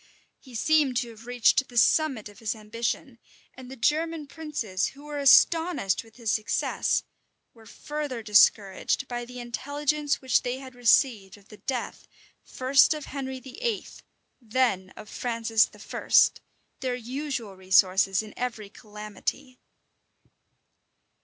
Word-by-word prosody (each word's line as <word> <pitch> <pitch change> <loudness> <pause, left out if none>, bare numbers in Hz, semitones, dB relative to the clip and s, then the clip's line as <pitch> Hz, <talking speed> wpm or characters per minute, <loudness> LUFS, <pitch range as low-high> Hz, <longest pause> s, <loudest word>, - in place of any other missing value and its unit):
He 255 -3 -14
seemed 285 +1 +2
to 240 -1 -1
have 225 +1 -15
reached 245 +2 +3
the 245 - -9
summit 265 -3 +3
of 205 - -15
his 225 0 -2
ambition; 230 +4 -4 0.3
and 255 -1 -12
the 265 - -8
German 310 +5 0
princes, 280 - -3
who 280 +1 -12
were 295 -1 -5
astonished 320 - +4
with 225 -1 -20
his 230 -3 -2
success, 215 0 0 0.5
were 225 -2 -18
further 295 -6 -5
discouraged 210 +3 +3
by 240 -1 -4
the 250 +1 -10
intelligence 285 +4 -2
which 260 -2 +2
they 245 +1 -3
had 265 -1 -10
received 230 -4 +2
of 205 0 -22
the 210 - -13
death, 245 +4 -5 0.4
first 270 +4 +3
of 300 - -7
Henry 265 -2 -5
VIII., 420 - -4 0.6
then 220 -5 0
of 215 - -10
Francis 230 -2 +1
I., - - -9 0.7
their 255 -2 -2
usual 250 -3 -5
resources 190 +1 +3
in 215 - -11
every 225 -5 -4
calamity. 215 +5 -7
245 Hz, 135 wpm, -26 LUFS, 215-275 Hz, 0.7 s, astonished